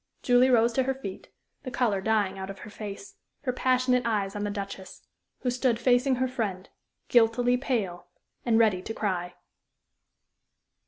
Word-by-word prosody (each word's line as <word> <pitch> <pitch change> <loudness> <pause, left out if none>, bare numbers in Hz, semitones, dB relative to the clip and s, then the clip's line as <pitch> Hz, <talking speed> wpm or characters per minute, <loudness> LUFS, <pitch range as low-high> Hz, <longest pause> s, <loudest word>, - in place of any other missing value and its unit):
Julie 250 +1 +5
rose 235 -1 +4
to 265 - +2
her 265 0 0
feet, 200 -8 -8 0.3
the 265 - -6
color 230 -6 0
dying 205 -2 +1
out 190 0 -5
of 195 - -7
her 210 - -10
face, 205 -2 -8 0.2
her 255 -3 -1
passionate 255 0 +2
eyes 205 -4 -1
on 205 - -3
the 205 - -1
Duchess, 200 -2 -7 0.4
who 250 - 0
stood 250 -1 +1
facing 250 +2 +3
her 260 +1 0
friend, 205 -7 -3 0.4
guiltily 240 +1 +4
pale, 210 -10 -2 0.4
and 230 -2 +3
ready 215 -5 +3
to 225 +4 -6
cry. 180 -4 -2
225 Hz, 160 wpm, -27 LUFS, 200-250 Hz, 0.4 s, Julie